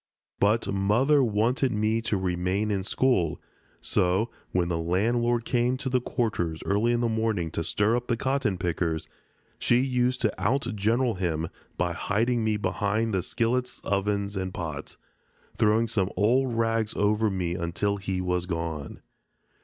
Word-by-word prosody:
But 105 +3 +3
Mother 120 +9 +3
wanted 120 +4 +1
me 110 +1 +1
to 110 -2 0
remain 95 +3 -1
in 95 -2 -1
school, 95 -6 +1 0.4
so, 95 +6 +1 0.2
when 90 -1 +1
the 85 -1 -1
landlord 115 +7 +1
came 125 +1 +1
to 135 0 -3
the 125 -1 +2
quarters 85 -10 -2
early 105 +4 +2
in 120 0 +1
the 120 - +2
morning 110 -7 -1
to 80 - -2
stir 105 +7 +1
up 125 0 -2
the 115 - 0
cotton 130 -7 0
pickers, 85 -2 -1 0.5
she 120 - +3
used 125 -1 +1
to 110 -3 +2
outgeneral 115 0 +1
him 80 -3 -1 0.3
by 90 -1 0
hiding 115 +6 0
me 110 -1 +1
behind 100 +3 0
the 95 - +1
skillets, 125 +6 -1
ovens, 100 0 -1
and 95 -1 -3
pots, 80 -5 -5 0.6
throwing 110 +1 +3
some 100 -4 0
old 120 +5 +2
rags 115 -1 0
over 105 +1 +2
me 90 -3 -2
until 90 +4 -1
he 95 -1 -2
was 90 -1 -1
gone. 80 -4 -4
105 Hz, 155 wpm, -27 LUFS, 90-120 Hz, 0.6 s, But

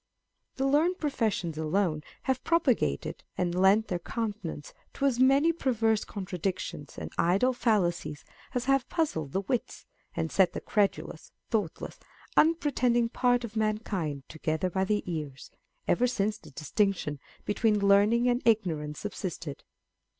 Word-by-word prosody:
The 265 - -1
learned 310 +7 +3
professions 215 - -1
alone 160 0 0 0.2
have 260 -1 -1
propagated 265 - +1
and 175 -1 0
lent 195 +4 +4
their 180 - -2
countenance 200 -7 -5 0.2
to 280 - -1
as 255 -3 +2
many 275 +5 +5
perverse 225 -8 +1
contradictions 185 -6 -4
and - - -6
idle 200 +10 +3
fallacies 175 - 0 0.3
as 250 - 0
have 275 -1 +2
puzzled 160 - -1
the 190 - 0
wits, 245 +4 -3 0.3
and 165 -1 -2
set 190 -2 +3
the - - -3
credu 205 -2 +1
lous, - - -12 0.2
thoughtless, 205 -8 -2 0.4
unpretending 255 -7 +3
part 245 0 +2
of 225 -2 -7
mankind 210 -10 -1
together 160 +3 -2
by 190 +2 +1
the 210 +1 0
ears, 150 -6 -5 0.4
ever 250 - +3
since 215 -3 -1
the 155 - -14
distinction 155 0 -1 0.3
between 210 +1 +2
learning 205 +4 +4
and 245 0 +2
ignorance 165 -10 +1
subsisted. 175 -8 -5
210 Hz, 135 wpm, -29 LUFS, 175-245 Hz, 0.4 s, many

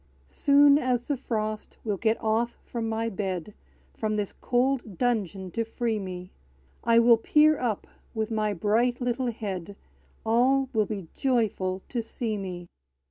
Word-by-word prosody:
Soon 280 - +5
as 250 -3 0
the 290 - +1
frost 215 -4 -3
will 210 -3 -1
get 220 +3 +1
off 225 +2 0
from 230 -2 -4
my 225 +1 -1
bed, 190 -3 -3 0.4
From 215 -1 -2
this 205 -2 -2
cold 245 -5 0
dungeon 200 -6 -1
to 230 - -1
free 225 -1 -2
me, 180 -2 -7 0.5
I 230 0 +4
will 235 0 +7
peer 300 +6 +4
up, 225 -5 -1 0.3
with 220 0 -2
my 215 -1 +1
bright 220 +6 +1
little 245 0 0
head; 200 -4 -5 0.5
All 255 +4 +3
will 215 -3 +2
be 200 -6 -5
joyful 205 -7 0
to 240 - -1
see 225 -1 -3
me! 180 -3 -5
225 Hz, 150 wpm, -27 LUFS, 205-245 Hz, 0.5 s, will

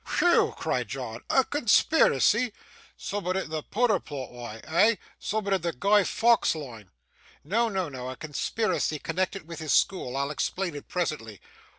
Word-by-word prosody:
'Whew!' 350 -1 +4
cried - - -1
John, - - -6
'a 265 - +4
conspiracy! 235 - +3 0.4
Soom'at 190 -2 -3
in 190 -4 -3
the 155 -1 -2
pooder 215 +2 +1
plot 135 -4 -6
wa'? 120 -3 -8
Eh? 205 +8 +4 0.2
Soom'at 205 -1 -1
in 190 - +1
the 170 0 -2
Guy 200 +9 +3
Faux 230 -2 +3
line?' 120 -10 -9 0.5
'No, 225 +9 +1
no, 190 -4 -1
no, 130 -3 -6
a 130 - -6
conspiracy 155 - -1
connected 185 +2 -3
with 170 -1 -7
his 155 -2 -1
school; 135 -9 +1
I'll 140 +1 -1
explain 180 +3 -2
it 145 - -9
presently. 150 - -3
180 Hz, 160 wpm, -27 LUFS, 145-210 Hz, 0.5 s, Whew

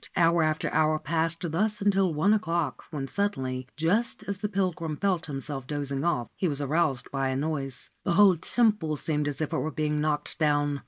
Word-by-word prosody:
Hour 170 0 +4
after 155 0 0
hour 155 0 +3
passed 165 +3 -1
thus 210 +6 +1
until 195 -2 +2
one 160 +7 +3
o'clock, 170 -9 -1
when 140 -4 -4
suddenly, 130 -10 -2
just 200 +10 +1
as 200 -1 -4
the 210 0 -2
pilgrim 180 -6 -1
felt 185 -3 0
himself 135 -2 -4
dozing 140 -1 -2
off, 145 -9 0
he 185 - 0
was 145 -3 0
aroused 145 -2 0
by 135 -1 0
a 130 - -1
noise. 140 -2 -3
The 175 - +1
whole 190 -1 +6
temple 210 -4 +1
seemed 150 0 -1
as 145 +1 -3
if 155 - -2
it - - +1
were 155 - -1
being 150 -1 -1
knocked 150 0 -2
down. 145 -2 +2
155 Hz, 195 wpm, -27 LUFS, 145-180 Hz, -, whole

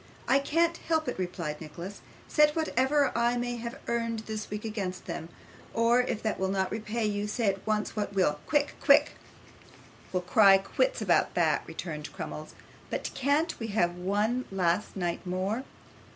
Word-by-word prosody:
'I 270 - +5
can't 335 +4 +1
help 320 -1 0
it,' - - -3
replied 170 -4 -3
Nicholas. 170 +5 -8 0.3
'Set 300 -1 +4
whatever 290 -2 +2
I 235 +1 +2
may 245 0 -2
have 235 +3 -6
earned 230 -1 -1
this 220 -1 -5
week 210 +1 -5
against 195 -5 -4
them, 165 - -5 0.5
or 230 +2 +4
if 235 -3 -3
that 220 - -1
will 190 - +1
not 190 -1 0
repay 215 +1 -2
you, 205 0 -1
say 210 0 +1
at 195 +1 -4
once 215 -1 0
what 205 -2 -2
will. 150 -6 +2
Quick, 290 -1 +2
quick.' - - +6 1.0
'We'll 180 -1 -1
cry 195 +1 +7
quits - - 0
about - - +2
that,' - - +3
returned 150 -3 -6
Crummles. 155 0 -7 0.3
'But - - -3
can't 285 +5 +1
we 225 - -3
have 175 -2 +3
one 210 +7 0
last 185 0 0
night 175 -3 -2
more? 190 +7 -2
215 Hz, 165 wpm, -29 LUFS, 185-245 Hz, 1.0 s, cry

